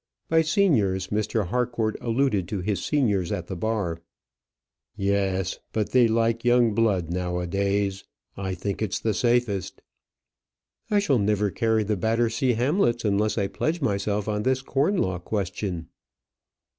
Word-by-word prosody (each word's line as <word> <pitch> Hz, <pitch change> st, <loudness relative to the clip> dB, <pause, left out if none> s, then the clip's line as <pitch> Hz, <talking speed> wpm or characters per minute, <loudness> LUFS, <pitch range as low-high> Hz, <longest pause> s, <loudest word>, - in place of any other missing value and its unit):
By 160 Hz, 0 st, +4 dB
seniors, 120 Hz, -, +2 dB
Mr. 105 Hz, -2 st, -1 dB
Harcourt 120 Hz, -2 st, 0 dB
alluded 115 Hz, -6 st, +1 dB
to 100 Hz, 0 st, -3 dB
his 100 Hz, +1 st, -2 dB
seniors 105 Hz, -, +1 dB
at 90 Hz, -, -3 dB
the 95 Hz, -, -6 dB
bar. 90 Hz, -4 st, -2 dB, 0.9 s
"Yes; 95 Hz, -2 st, 0 dB
but 110 Hz, -2 st, -1 dB
they 125 Hz, -2 st, +5 dB
like 115 Hz, +1 st, +1 dB
young 120 Hz, -2 st, +4 dB
blood 100 Hz, -7 st, +1 dB
nowadays. 95 Hz, +3 st, -1 dB, 0.3 s
I 95 Hz, -1 st, -3 dB
think 100 Hz, +3 st, -4 dB
it's 105 Hz, -4 st, -1 dB
the 110 Hz, -, 0 dB
safest." 120 Hz, -5 st, 0 dB, 1.1 s
"I 210 Hz, -, +2 dB
shall 150 Hz, -, +2 dB
never 105 Hz, 0 st, +1 dB
carry 110 Hz, +3 st, +1 dB
the 105 Hz, 0 st, -1 dB
Battersea 115 Hz, +4 st, +1 dB
Hamlets 120 Hz, -, +1 dB
unless 105 Hz, +1 st, +1 dB
I 100 Hz, -, +1 dB
pledge 155 Hz, -, -2 dB
myself 100 Hz, -5 st, -1 dB
on 105 Hz, -1 st, -1 dB
this 130 Hz, +3 st, 0 dB
corn 145 Hz, +10 st, +1 dB
law 95 Hz, -, 0 dB
question." 95 Hz, -3 st, -3 dB
105 Hz, 140 wpm, -25 LUFS, 95-120 Hz, 1.1 s, they